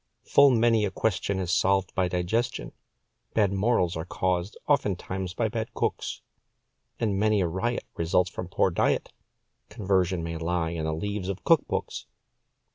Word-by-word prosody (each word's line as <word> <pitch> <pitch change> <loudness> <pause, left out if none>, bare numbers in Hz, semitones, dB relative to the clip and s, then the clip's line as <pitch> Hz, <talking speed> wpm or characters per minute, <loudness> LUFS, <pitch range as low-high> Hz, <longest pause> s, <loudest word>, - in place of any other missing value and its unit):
Full 140 0 +6
many 115 -3 +3
a 105 - +1
question 100 0 -1
is 95 0 -1
solved 95 -1 +2
by 95 -1 +1
digestion. 90 +7 -1 0.6
Bad 100 -3 +3
morals 95 -3 +1
are 80 - -3
caused, 90 +2 -2
oftentimes 95 -8 -1
by 115 - +1
bad 110 0 -4
cooks, - - -2 0.8
And 100 -4 0
many 110 0 +3
a 90 - +1
riot 95 +8 -2
results 90 +2 +1
from 90 - -5
poor 95 +1 +1
diet - - 0 0.6
Conversion 95 -5 0
may 85 0 -4
lie 85 0 -1
in 80 -2 -3
the 80 - -1
leaves 100 +2 -3
of 100 0 -4
cook 165 -2 +4
books. - - -4
95 Hz, 155 wpm, -27 LUFS, 90-110 Hz, 0.8 s, Full